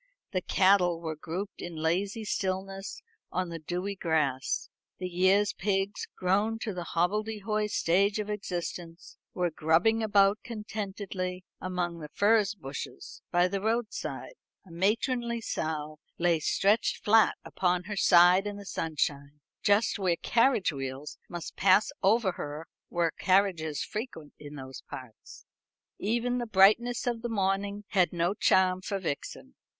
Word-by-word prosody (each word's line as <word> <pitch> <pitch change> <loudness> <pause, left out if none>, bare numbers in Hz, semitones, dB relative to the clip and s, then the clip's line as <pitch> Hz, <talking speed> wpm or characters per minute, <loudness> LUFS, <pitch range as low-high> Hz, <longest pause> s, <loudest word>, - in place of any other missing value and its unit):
The 185 -4 0
cattle 180 -2 +3
were 160 -2 -4
grouped 180 +6 -6
in 175 -1 -6
lazy 190 +7 -1
stillness 195 - -3 0.3
on 185 -1 -1
the 165 -1 -6
dewy 180 +5 -3
grass; 150 -7 0 0.3
the 185 - -5
year's 190 +3 +3
pigs, 195 +1 -1
grown 205 +5 +1
to 215 - -3
the 175 -1 -5
hobbledehoy 210 +4 0
stage 200 +2 +2
of 210 -1 -3
existence, 175 -4 -5 0.2
were 180 -2 0
grubbing 165 +9 +2
about 205 -1 +4
contentedly 200 -4 -5 0.2
among 180 -2 -3
the 150 -2 -8
furze 210 +4 +3
bushes; 135 -7 -8
by 175 +1 +3
the 195 +1 -3
roadside, 225 - -2 0.3
a 180 - -16
matronly 235 +6 0
sow 155 -7 -4 0.2
lay 170 -1 +2
stretched 200 +8 +1
flat 220 +1 +5
upon 180 -1 0
her 210 +3 -5
side 180 +1 +6
in 205 0 -5
the 200 - -10
sunshine, 145 -4 -2 0.2
just 205 0 +2
where 185 -3 +2
carriage 230 - +2
wheels 135 +1 -6
must 175 -2 -6
pass 195 +2 +4
over 205 0 +3
her 150 -1 -6 0.2
were 170 -1 +1
carriages 185 -6 +2
frequent 210 - -6
in 145 0 -9
those 130 -2 -8
parts. 125 -4 -11 0.5
Even 240 +4 0
the 240 - -3
brightness 220 +4 +4
of 240 -2 -1
the 240 - -3
morning 200 0 -1
had 185 -4 +3
no 175 +2 0
charm 185 -2 +3
for 200 +1 -3
Vixen. 145 - -5
190 Hz, 140 wpm, -29 LUFS, 170-210 Hz, 0.5 s, side